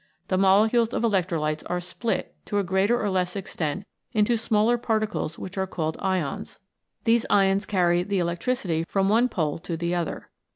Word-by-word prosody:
The 185 Hz, -, +2 dB
molecules 220 Hz, +5 st, +4 dB
of -, -, -1 dB
electrolytes 170 Hz, -8 st, 0 dB
are 180 Hz, -, 0 dB
split, 185 Hz, +6 st, -3 dB
to 205 Hz, -, -2 dB
a 200 Hz, -, +2 dB
greater 190 Hz, +6 st, +2 dB
or 210 Hz, -, -1 dB
less 180 Hz, 0 st, 0 dB
extent, 190 Hz, -2 st, -3 dB, 0.3 s
into 220 Hz, +1 st, +3 dB
smaller 225 Hz, +1 st, +2 dB
particles 215 Hz, -8 st, -1 dB
which 190 Hz, +1 st, -6 dB
are 190 Hz, -, 0 dB
called 160 Hz, -3 st, -2 dB
Ions. 185 Hz, -7 st, -2 dB, 0.5 s
These 230 Hz, 0 st, +3 dB
ions 195 Hz, 0 st, +3 dB
carry 175 Hz, -3 st, +2 dB
the 200 Hz, +2 st, -1 dB
electricity 170 Hz, 0 st, -1 dB
from 195 Hz, -1 st, +1 dB
one 235 Hz, +4 st, +4 dB
pole 160 Hz, -7 st, -1 dB
to 165 Hz, 0 st, -4 dB
the 170 Hz, +1 st, -1 dB
other. 175 Hz, -2 st, -3 dB
190 Hz, 170 wpm, -25 LUFS, 175-215 Hz, 0.5 s, molecules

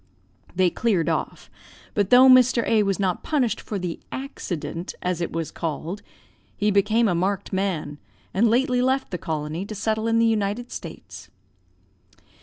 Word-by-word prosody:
"They 180 Hz, -1 st, +3 dB
cleared 200 Hz, -8 st, +1 dB
off; -, -, -3 dB, 0.5 s
but 205 Hz, -2 st, +1 dB
though 255 Hz, +1 st, +8 dB
Mr. 255 Hz, -2 st, +6 dB
A 220 Hz, -2 st, +4 dB
was 195 Hz, -1 st, 0 dB
not 185 Hz, -3 st, 0 dB
punished 265 Hz, -7 st, 0 dB
for 210 Hz, -, -5 dB
the 180 Hz, -3 st, -4 dB
accident, 180 Hz, -, -5 dB
as 180 Hz, -1 st, -1 dB
it 170 Hz, -, -2 dB
was 165 Hz, -1 st, -3 dB
called, 165 Hz, +4 st, -4 dB, 0.6 s
he 210 Hz, 0 st, +2 dB
became 215 Hz, +4 st, +3 dB
a 190 Hz, -, +2 dB
marked 195 Hz, +4 st, -1 dB
man, 170 Hz, -7 st, -2 dB, 0.3 s
and 220 Hz, +5 st, +3 dB
lately 250 Hz, +1 st, +2 dB
left 260 Hz, 0 st, 0 dB
the 180 Hz, -, -3 dB
colony, 155 Hz, +1 st, -3 dB
to 215 Hz, +2 st, -7 dB
settle 220 Hz, +2 st, -1 dB
in 230 Hz, 0 st, +2 dB
the 230 Hz, -, +4 dB
United 220 Hz, +2 st, -1 dB
States. -, -, -9 dB
200 Hz, 160 wpm, -24 LUFS, 180-230 Hz, 0.6 s, though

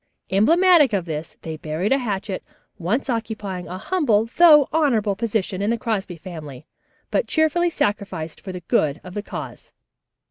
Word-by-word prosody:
Emblematic 315 Hz, -, +5 dB
of 190 Hz, -4 st, 0 dB
this 155 Hz, -1 st, -6 dB
they 160 Hz, -1 st, -5 dB
buried 160 Hz, +6 st, -2 dB
a 270 Hz, -, +4 dB
hatchet, 200 Hz, -5 st, -3 dB, 0.4 s
once 210 Hz, +12 st, -1 dB
occupying 215 Hz, -6 st, -3 dB
a 180 Hz, -, -5 dB
humble 230 Hz, -, +1 dB
though 305 Hz, -5 st, +8 dB
honorable 230 Hz, -11 st, +2 dB
position 200 Hz, -3 st, -2 dB
in 205 Hz, -, 0 dB
the 235 Hz, -, +1 dB
Crosby 215 Hz, -6 st, -2 dB
family, 155 Hz, -7 st, -9 dB, 0.5 s
but -, -, +1 dB
cheerfully 330 Hz, +2 st, +2 dB
sacrificed 200 Hz, -, -3 dB
for 190 Hz, -, -7 dB
the 180 Hz, -1 st, -7 dB
good 155 Hz, -2 st, +1 dB
of 180 Hz, -, -10 dB
the 205 Hz, -, -3 dB
cause. -, -, -8 dB
205 Hz, 155 wpm, -22 LUFS, 180-265 Hz, 0.5 s, though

